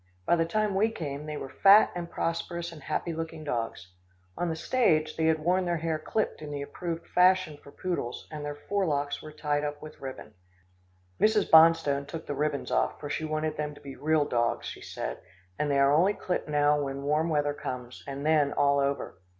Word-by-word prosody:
By 175 - +4
the 165 -1 +1
time 210 +4 0
we 205 +4 +3
came, 150 -8 -5
they 150 -1 -4
were 135 - -5
fat 200 +2 +8
and 170 -1 -4
prosperous 170 +1 -3
and 160 -2 -11
happy 155 +3 -2
looking 160 -1 -5
dogs. 115 - -4 0.4
On 175 - -1
the 160 - -1
stage, 160 -6 +1
they 160 - 0
had 160 0 +4
worn 180 +4 +1
their 175 -1 0
hair 160 -1 -2
clipped 215 +5 -2
in 150 - -7
the 145 -1 -4
approved 165 +3 -5
fashion 185 -3 +3
for 140 - -13
poodles, 170 -10 -4
and 150 -1 -6
their 145 0 -4
forelocks 145 -4 -1
were 155 - -9
tied 150 -1 -1
up 145 0 -3
with 155 0 -11
ribbon. 135 -1 -8 0.9
Mrs. 215 -1 +3
Bonstone 160 -4 +6
took 165 +1 -7
the - - -3
ribbons 145 0 -2
off, - - +1
for 145 -1 -6
she 155 - -2
wanted 155 0 -2
them 150 -1 -3
to - - -14
be 140 -2 -9
real 155 0 +2
dogs, 120 -4 0
she - - -7
said, - - -5 0.4
and 150 - 0
they 140 - +2
are 140 +1 +5
only 185 +7 +4
clipped 180 - -3
now 145 0 +3
when 140 0 -4
warm 150 +3 +1
weather 145 -2 +1
comes, 125 -3 -6
and 140 +1 -5
then 150 -2 +3
all 140 0 +3
over. 140 -9 -2
155 Hz, 205 wpm, -28 LUFS, 145-165 Hz, 0.9 s, fat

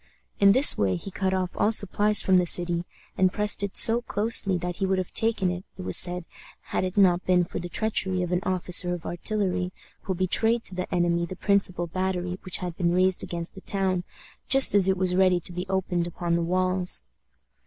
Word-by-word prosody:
In 200 0 +6
this 265 +5 +8
way 95 -2 +1
he 195 - -8
cut 190 0 -2
off 185 -1 -3
all 210 - +1
supplies 210 0 +3
from 190 -1 +3
the 180 -1 +1
city, 175 0 0 0.3
and 185 -1 +3
pressed 210 +1 -1
it 200 -1 -4
so 230 +1 +5
closely 205 -4 +1
that 175 0 -5
he 195 - -1
would 190 0 0
have 185 -1 -5
taken 220 -5 0
it, 180 +1 -6
it 185 - -8
was - - 0
said, 180 -1 +2 0.5
had - - 0
it 185 +2 -5
not 180 -3 +3
been 180 -1 +3
for - - -6
the 175 0 -7
treachery 190 -2 -1
of 175 - -5
an 180 - +1
officer 180 -2 +1
of 170 - -12
artillery, 180 0 -2 0.3
who 190 - -3
betrayed 225 +6 +1
to - - -2
the 180 0 -6
enemy 170 -1 0
the 185 - -8
principal 190 -2 -1
battery 180 +1 -4
which 185 - -4
had 180 -2 -6
been 175 -1 -1
raised 185 0 +2
against 170 -1 -6
the 190 - -12
town 190 -3 -2 0.4
just 270 0 +4
as 195 -2 +4
it 190 - 0
was 185 -1 -1
ready 185 -1 +3
to 175 - -5
be 180 +2 -6
opened 180 -2 -2
upon 170 0 -3
the 170 - -1
walls. 185 - 0
185 Hz, 215 wpm, -25 LUFS, 175-195 Hz, 0.5 s, this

